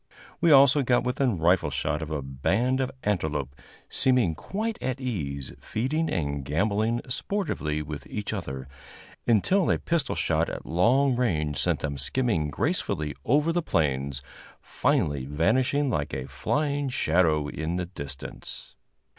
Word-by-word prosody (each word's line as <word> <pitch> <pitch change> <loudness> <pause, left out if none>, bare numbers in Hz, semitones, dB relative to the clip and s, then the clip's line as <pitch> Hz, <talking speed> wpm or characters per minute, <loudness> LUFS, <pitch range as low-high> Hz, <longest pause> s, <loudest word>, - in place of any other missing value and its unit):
We 170 - +3
also 140 0 +7
got 125 -2 +2
within 125 -3 0
rifle 85 -1 +3
shot 75 +2 -1
of 80 - -5
a 75 -3 -3
band 100 - 0
of 130 - 0
antelope, 80 -9 -1 0.3
seeming 125 -10 +3
quite 215 - -4
at 130 0 -2
ease, 70 - -3
feeding 150 +9 -1
and 70 -5 -2
gamboling 105 - 0
sportively 125 - -2
with 75 0 -7
each 105 0 -4
other, 65 -9 -5 0.6
until 145 - +3
a - - +3
pistol 170 -4 -1
shot - - +1
at - - -6
long 125 - +3
range 75 - 0
sent - - +1
them 70 -2 -3
skimming 90 - 0
gracefully 75 +1 -1
over 150 +6 +3
the 175 - +1
plains, 70 - -1 0.4
finally 70 -3 0
vanishing 125 - +2
like 75 -7 -2
a 65 -1 -4
flying 145 - -1
shadow 80 - +2
in 80 +3 -3
the 90 0 -1
distance. 70 -6 -8
90 Hz, 140 wpm, -27 LUFS, -, 0.6 s, also